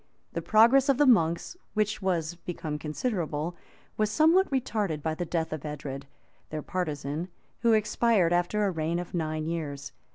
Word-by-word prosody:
The - - -2
progress 240 +6 +5
of 275 - +4
the 290 - +5
monks, 170 - +3 0.2
which 215 0 0
was 175 -4 0
become 165 -3 -5
considerable, 165 -1 -2 0.4
was 215 -1 +2
somewhat 325 - +4
retarded 215 - -1
by 160 - 0
the 175 +2 -3
death 160 -2 -1
of 155 - -5
Edred, 140 -2 -6 0.4
their 155 -1 -4
partisan, 155 -2 -3 0.3
who 230 -1 +3
expired 215 -4 +3
after 175 +4 +1
a 195 - +1
reign 165 0 -1
of 175 0 -5
nine 155 -2 -2
years. 150 -4 -4
175 Hz, 160 wpm, -28 LUFS, 155-215 Hz, 0.4 s, progress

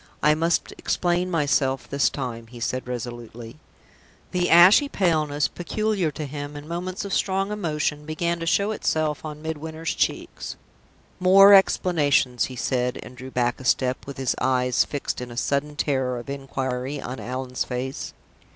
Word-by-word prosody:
"I 150 - +6
must 165 +2 0
explain 175 +1 0
myself 140 -5 +1
this 140 0 +2
time," 120 -4 -5
he 120 +1 -11
said, 130 +2 -2
resolutely. 120 0 -7 0.7
The 180 -1 +1
ashy 185 - +7
paleness 155 - +1
peculiar 205 -1 -1
to 150 +1 -5
him 145 +1 -6
in 145 +1 -9
moments 180 +4 -4
of 200 - -4
strong 195 +1 0
emotion 150 -6 -2
began 170 +2 -1
to 165 - -4
show 200 +5 +2
itself 155 -7 -1
on 155 -1 -7
Midwinter's 160 +1 -4
cheeks. - - -2 0.6
"More 195 +2 +8
explanations!" 145 -10 +3
he 130 - -8
said, 125 0 -1
and 125 - -12
drew 130 +1 -9
back 120 -1 0
a - - -9
step, 130 0 0
with 140 - -7
his 130 -2 0
eyes 125 -1 +2
fixed 145 -3 -4
in 125 - -6
a 120 - -10
sudden 140 +3 -1
terror 130 -4 0
of 120 +3 -6
inquiry 135 0 -3
on 130 0 -6
Allan's 130 0 -3
face. 130 +1 -4
145 Hz, 160 wpm, -24 LUFS, 130-170 Hz, 0.7 s, More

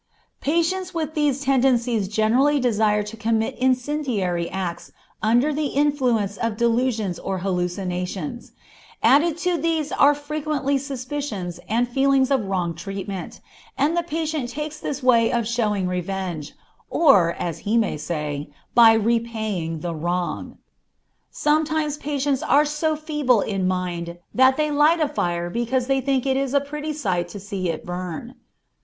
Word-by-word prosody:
_ - - -51
Patients 340 +4 0
with 315 -2 -2
these 290 -3 +1
tendencies 245 -5 +2
generally 235 +8 +2
desire 215 -4 +2
to 210 +2 -8
commit 225 +3 0
incendiary 250 - 0
acts 185 -3 -4 0.3
under 240 +7 +3
the 300 0 0
influence 255 -9 +1
of 230 -2 -2
delusions 230 -5 0
or 195 -1 -3
hallucinations; 180 +5 -3 0.5
added 310 +4 +4
to 355 0 0
these 320 -1 0
there - - -2
are 290 +1 +7
frequently 290 -1 -2
suspicions 255 - -5
and 235 +3 +2
feelings 270 +1 +2
of 260 -7 +2
wrong 180 -3 -1
treatment, 195 +2 -6 0.4
and 305 +4 +2
the 345 - +2
patient 315 -5 -3
takes 300 +3 -5
this 280 -2 -4
way 235 -3 +4
of 235 -2 0
showing 210 -5 0
revenge, 180 -3 -3 0.4
or, 195 - +5
as 170 -2 -4
he 210 +7 0
may 220 -7 +1
say, 150 -2 -4 0.3
of 225 -2 +7
repaying 220 -8 -1
the 170 0 -3
wrong. 175 +2 -3 0.7
Sometimes 305 0 0
patients 285 -2 -1
are 295 +1 +4
so 300 +1 0
feeble 295 -7 +1
in 195 -3 -1
mind 175 -2 -3 0.2
that 260 +1 +5
they 305 -1 +1
light 300 +3 +4
a 305 - +2
fire 175 -6 -2
because 240 +3 0
they 270 0 +1
think 265 -1 0
it 265 -1 +1
is 275 0 -1
a - - +6
pretty 300 +2 -5
sight 185 - -1
to 205 - -8
see 195 -2 -3
it 165 - -4
burn. 180 +6 -5
240 Hz, 150 wpm, -23 LUFS, 190-290 Hz, 0.7 s, are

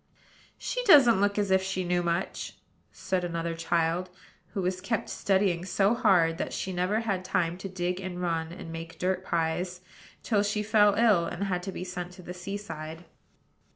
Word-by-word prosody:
"She - - -3
doesn't 250 - +7
look 205 0 +2
as 205 -2 +1
if 190 0 +5
she 190 0 -2
knew 175 0 +1
much," 170 +2 -2 0.3
said 185 -1 -2
another 170 -1 -2
child, 165 +2 0 0.5
who 195 - -1
was 185 0 -1
kept 220 +3 -2
studying 190 -3 +1
so 195 +3 +2
hard 185 -9 +3
that - - -3
she 190 - -3
never 185 +5 0
had 195 -5 -1
time 175 -2 0
to 195 - -6
dig 180 0 -2
and 185 -2 -5
run, 165 -2 -1
and 170 -2 -8
make 165 0 -7
dirt 185 0 -1
pies, 175 +1 -1 0.4
till 210 -4 +2
she 210 +1 0
fell 210 -1 +4
ill, 210 -7 +4
and 175 +3 -4
had 180 -3 -1
to 190 +2 -5
be 180 - -5
sent 180 -1 -6
to 180 0 -12
the 180 - -7
sea 190 +3 -5
side. 160 -4 -8
185 Hz, 190 wpm, -28 LUFS, 175-200 Hz, 0.5 s, doesn't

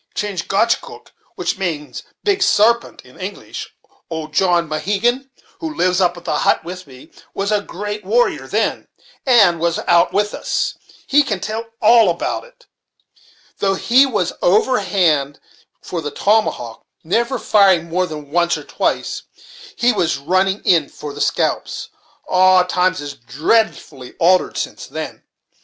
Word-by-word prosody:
Chingachgook, 205 +3 -1 0.2
which - - -2
means 160 -6 -4 0.2
'Big 400 -2 +1
Sarpent' 235 - +2
in 125 - -18
English, 190 +2 -7 0.3
old 160 -2 -6
John 175 -1 +2
Mohegan, 210 - -1 0.3
who 320 -1 -5
lives 180 +1 +1
up 175 -1 +2
at 175 - -12
the 150 - 0
hut - - +2
with 180 0 -8
me, 130 -1 -15 0.2
was 200 +1 -1
a 210 -1 +2
great 205 +2 -6
warrior 230 +6 +1
then, - - -1 0.4
and 205 -9 +5
was 170 0 0
out 170 -1 +4
with 210 +1 0
us; - - -2 0.3
he 290 +2 +4
can 285 - -2
tell 225 +2 -4 0.2
all 225 -2 +6
about 170 - -2
it, - - -20
too; - - -25 0.9
though 195 -1 +1
he 255 +7 +4
was 205 -9 -1
overhand 180 - +2 0.4
for 170 - -4
the 150 - -4
tomahawk, 195 - 0 0.2
never 235 +9 0
firing 190 -5 +3
more 180 +2 0
than 150 -3 -9
once 170 +1 +2
or - - -9
twice, - - -2
before - - -18
he 245 +1 +2
was 170 -6 0
running 185 +7 0
in 165 -6 +3
for 150 -1 -8
the 145 - -7
scalps. - - -1 0.4
Ah! 185 0 +5
times 180 -2 0
is 145 -1 -6
dreadfully 140 - -1
altered 180 +2 +2
since - - -5
then. - - -7
185 Hz, 150 wpm, -18 LUFS, 165-215 Hz, 0.9 s, all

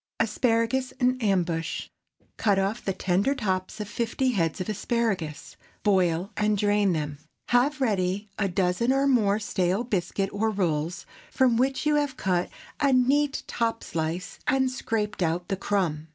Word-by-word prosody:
ASPARAGUS 230 +3 +1
IN 255 0 +1
AMBUSH. 175 -6 -1 0.4
✠ - - -50
Cut 205 -3 +2
off 195 +4 -1
the 195 - 0
tender 195 +8 +1
tops 190 -4 -2
of 210 - -4
fifty 235 +4 -1
heads 165 -8 0
of 185 - -3
asparagus; 210 -8 -2 0.3
boil 185 -1 +2
and 210 0 +1
drain 205 -1 +2
them. 150 -2 -3 0.3
Have 270 +5 +3
ready 200 -4 0
half 195 -2 +1
a - - -7
dozen 190 +6 +1
(or 275 +1 +2
more) 215 -7 +3
stale 190 0 0
biscuit 195 -3 -1
or 220 +2 +1
rolls, 170 -4 -1 0.2
from 255 -3 +3
which 265 +4 +1
you 300 0 +3
have 285 -3 -1
cut 180 -2 0 0.3
a 280 -2 +3
neat 275 +3 +2
top 230 -1 -1
slice 165 +3 -3
and 265 -1 +2
scraped 215 -5 -2
out 175 +2 0
the 195 - +1
crumb. 180 -6 -1
205 Hz, 160 wpm, -26 LUFS, 180-245 Hz, 0.4 s, Have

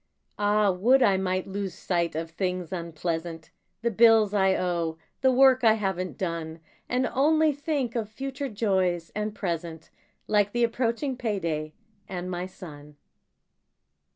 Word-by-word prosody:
Ah, 205 0 +3
would 245 +9 +4
I 200 -4 +4
might 185 -1 -1
lose 195 -2 -4
sight 170 -3 -1
of 165 +1 -4
things 180 0 -3
unpleasant: 165 -1 -4 0.3
The 235 - +1
bills 225 -1 +5
I 190 -2 +3
owe; 170 -3 -1 0.2
the 260 -1 +4
work 260 0 +5
I 220 -2 +6
haven't 190 -4 -3
done. 165 -3 -4 0.3
And 250 +1 +1
only 310 +3 +4
think 285 -4 -2
of 220 -3 -2
future 270 +4 -5
joys 190 -6 0
and 210 0 -3
present, 170 -4 -4 0.3
Like 205 -1 +2
the 240 0 +1
approaching 235 +3 -1
payday, 165 -10 -2 0.4
and 180 -1 -4
my 180 +1 -3
son. 150 -5 -12
195 Hz, 140 wpm, -26 LUFS, 170-235 Hz, 0.4 s, I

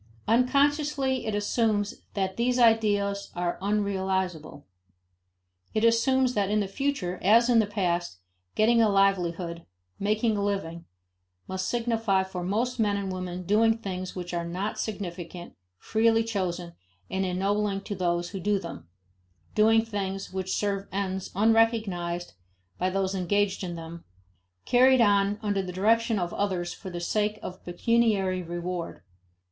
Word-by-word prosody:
Unconsciously 275 +1 +2
it 215 - -1
assumes 205 0 0
that 190 -2 -1
these 245 +1 +1
ideals 205 -4 +2
are 175 0 -2
unrealizable; 190 -6 -1 1.1
it 215 - +1
assumes 250 +3 +3
that 200 -3 0
in 210 +1 +2
the 200 - -1
future, 195 -5 -2
as 230 +5 +5
in 235 - +5
the 215 - +2
past, 175 - -1 0.4
getting 230 +2 +4
a 220 - +4
livelihood, 180 -4 +1 0.4
"making 215 +2 +1
a 200 - -1
living," 170 -5 -3 0.6
must 190 0 -3
signify 225 -5 +1
for 190 -2 -6
most 235 +7 -1
men 205 -2 +2
and 195 -1 -3
women 185 -1 -5
doing 225 +4 +3
things 185 -4 -5
which 180 -1 -6
are 170 -1 -1
not 185 +5 -3
significant, 175 -4 -5 0.2
freely 225 - +2
chosen, 185 -6 -3 0.4
and 190 - 0
ennobling 195 +2 0
to 205 +1 -6
those 175 -2 -1
who 195 - -5
do 205 +2 +1
them; 85 - -8 0.7
doing 225 +1 +4
things 195 -3 -4
which 190 0 -2
serve 200 -1 -1
ends 190 -1 -3
unrecognized 210 -5 +1 0.5
by 185 - +1
those 190 0 -1
engaged 195 +1 0
in 175 -2 -4
them, 165 0 -8 0.6
carried 255 +1 +5
on 205 -2 +3
under 205 -2 0
the 185 -1 -5
direction 225 +4 +2
of 175 -2 -2
others 185 -4 -1
for 190 - -9
the 175 -1 -5
sake 210 +4 0
of 185 +1 -8
pecuniary 195 -1 +1
reward. 175 - -5
200 Hz, 140 wpm, -27 LUFS, 180-225 Hz, 1.1 s, as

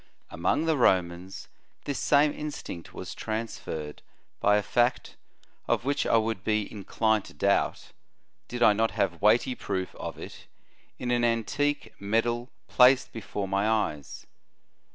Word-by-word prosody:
f - - -32 0.3
Among 95 - 0
the 160 -2 +2
Romans 90 -4 +1 0.4
this 140 -2 -2
same 145 +1 +4
instinct 150 - -7
was - - -7
transferred 110 -9 -5 0.4
by 105 0 +4
a 105 - 0
fact, 120 +3 0 0.5
of - - 0
which 140 +1 0
I - - +4
would 110 -3 -1
be 110 0 +1
in 100 -1 -9
clined 110 -2 +1
to - - -13
doubt, - - 0 0.6
did 120 - -2
I 105 - +7
not 110 +2 +1
have 85 -3 0
weighty 115 +5 +4
proof 95 -6 -4
of - - -7
it - - -10 0.5
in 125 -1 -3
an 120 -1 +2
antique 130 +6 0
medal 120 +4 0 0.2
placed 125 +1 +5
before 105 -3 -5
my 100 +2 +1
eyes. 100 -11 -2
110 Hz, 150 wpm, -27 LUFS, 100-125 Hz, 0.6 s, I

